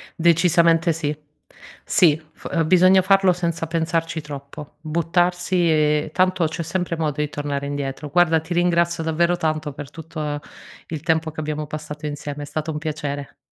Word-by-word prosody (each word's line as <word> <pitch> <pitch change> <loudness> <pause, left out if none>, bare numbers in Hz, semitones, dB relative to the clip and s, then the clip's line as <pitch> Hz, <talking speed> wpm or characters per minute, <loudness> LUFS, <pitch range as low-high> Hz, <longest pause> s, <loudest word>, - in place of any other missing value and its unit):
Decisamente 170 0 +4
sì. 150 -2 -2 0.7
Sì 160 -4 +4
f 165 -2 -2
bisogna 185 +2 +6
farlo 195 -1 +4
senza 170 -2 -2
pensarci 165 0 -1
troppo. 145 0 -9
Buttarsi 175 +3 0 0.2
e 150 0 +2
tanto 185 -2 +2
c'è 170 +2 -4
sempre 170 +1 -2
modo 150 -2 -1
di 150 - -1
tornare 145 -1 -3
indietro. 140 0 -4
Guarda 170 0 +4
ti 160 +3 -5
ringrazio 170 -1 +2
davvero 170 +2 +2
tanto 155 -3 -2
per 140 0 -8
tutto 155 -2 -5 0.5
il 155 -3 -5
tempo 160 0 0
che 155 - -8
abbiamo 150 0 -3
passato 150 0 -7
insieme. 145 0 -5
È - - -5
stato 155 +2 -3
un 150 - -4
piacere. 145 -2 -4
160 Hz, 155 wpm, -22 LUFS, 150-170 Hz, 0.7 s, bisogna